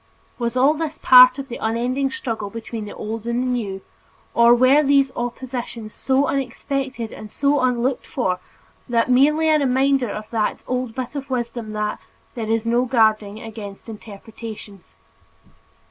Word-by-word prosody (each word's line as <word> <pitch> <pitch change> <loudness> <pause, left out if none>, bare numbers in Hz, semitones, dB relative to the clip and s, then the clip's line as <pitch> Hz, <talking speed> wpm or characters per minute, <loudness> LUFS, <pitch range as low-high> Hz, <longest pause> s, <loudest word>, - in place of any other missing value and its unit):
Was 235 +1 -2
all 270 +4 +5
this 315 0 -4
a - - -33
part 255 0 +8
of 275 -1 -6
the 240 - -6
unending 245 +5 -1
struggle 225 -5 -4
between 225 0 -6
the 205 - -9
old 220 +1 -5
and 250 +1 0
new, 200 -5 -3 0.5
or 235 +1 +6
were 255 +4 +5
these 275 -2 +3
oppositions 240 -2 -5
so 265 +1 +1
unexpected 270 -2 -3
and 215 -1 -10
so 285 0 +1
unlooked 255 0 0
for 185 -8 -1 0.5
merely 265 +7 +3
a 310 -1 +4
reminder 270 -2 +2
of 215 +1 -6
that 220 -2 -1
old 250 -2 -3
bit 255 0 -4
of 275 -2 -6
wisdom 235 -3 -3
that 210 0 -2 0.3
"there 225 -3 -4
is 225 0 0
no 240 +2 +2
guarding 220 -3 +1
against 215 -3 -9
interpretations"? 215 -2 -10
240 Hz, 150 wpm, -21 LUFS, 220-265 Hz, 0.5 s, part